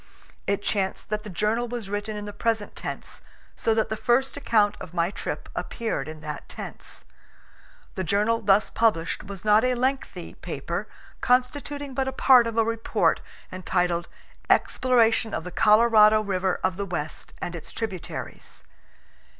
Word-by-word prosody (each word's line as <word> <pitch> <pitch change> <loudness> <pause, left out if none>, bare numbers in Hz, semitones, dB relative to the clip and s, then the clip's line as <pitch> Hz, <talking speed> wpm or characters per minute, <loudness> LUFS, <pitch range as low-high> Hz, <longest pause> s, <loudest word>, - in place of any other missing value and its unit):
It 200 0 0
chanced 195 -1 -1
that 210 0 0
the 210 - -9
journal 215 +6 0
was 235 -3 -5
written 205 +1 -3
in 205 - -5
the 205 - -7
present 220 0 -1
tense, - - -6 0.3
so 225 - +1
that 220 - +1
the 220 - -1
first 245 +4 +1
account 220 -7 +2
of 180 0 -9
my 170 +2 +1
trip - - -5
appeared 220 - -3
in 155 0 -8
that 150 -1 -7
tense. - - -9 0.9
The 190 - -3
journal 210 +5 +1
thus 200 0 +3
published 205 -8 +1
was 195 0 -8
not 210 +1 +5
a 255 0 +2
lengthy 260 +2 -2
paper, - - -4 0.3
constituting 280 +2 0
but 265 0 -1
a - - 0
part 255 -3 +6
of 230 0 -4
a 225 - +4
report 230 0 +1 0.3
entitled 180 -2 0 0.4
"Exploration 230 -3 +3
of 165 - -3
the 180 - -7
Colorado 215 +1 +6
River 190 -2 0
of 185 -1 0
the 200 - -2
West 155 -4 -5
and 175 - -4
its 165 - -8
Tributaries. 195 -6 -6
215 Hz, 160 wpm, -25 LUFS, 190-230 Hz, 0.9 s, part